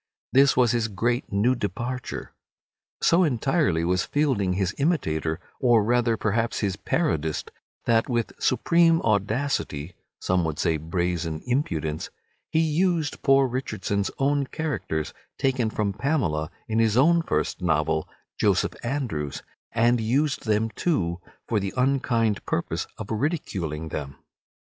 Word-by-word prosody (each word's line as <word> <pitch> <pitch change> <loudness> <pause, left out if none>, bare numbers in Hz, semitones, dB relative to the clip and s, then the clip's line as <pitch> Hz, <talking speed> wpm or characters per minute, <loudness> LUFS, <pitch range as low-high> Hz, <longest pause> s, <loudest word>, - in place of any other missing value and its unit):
This 135 0 +5
was 125 -2 +5
his 120 -2 +1
great 120 +4 -1
new 105 +5 +3
departure. 120 +3 -4 0.7
So 175 +2 +5
entirely 135 - +1
was 90 +1 +1
Fielding 130 -11 +1
his 95 +1 0
imitator, 80 - 0 0.2
or 120 -4 +4
rather 120 0 +2
perhaps 115 +2 0
his 100 -4 0
parodist, 80 0 -1 0.3
that 115 +1 +2
with 120 -2 -1
supreme 165 +5 +3
audacity 105 - -1 0.3
(some 90 -1 +1
would 80 -2 -2
say 80 -2 +1
brazen 85 0 -2
impudence) 85 - -1 0.4
he 160 - +2
used 165 0 +1
poor 135 0 +5
Richardson's 105 -5 -2
own 140 0 +1
characters, 145 - -3 0.2
taken 130 -4 +1
from 105 -2 -1
"Pamela," 100 - 0 0.2
in 110 0 0
his 110 0 +3
own 165 +6 +5
first 165 - -1
novel, 80 -2 +1 0.3
"Joseph - - +2
Andrews," 120 - -3 0.3
and 120 +1 +3
used 130 +3 0
them 110 +1 +1
too 90 - -1 0.3
for 110 - +1
the 100 -1 -4
unkind 125 -5 +1
purpose - - -2
of 110 -1 -7
ridiculing 95 - -2
them. 70 -3 -5
115 Hz, 130 wpm, -25 LUFS, 90-135 Hz, 0.7 s, This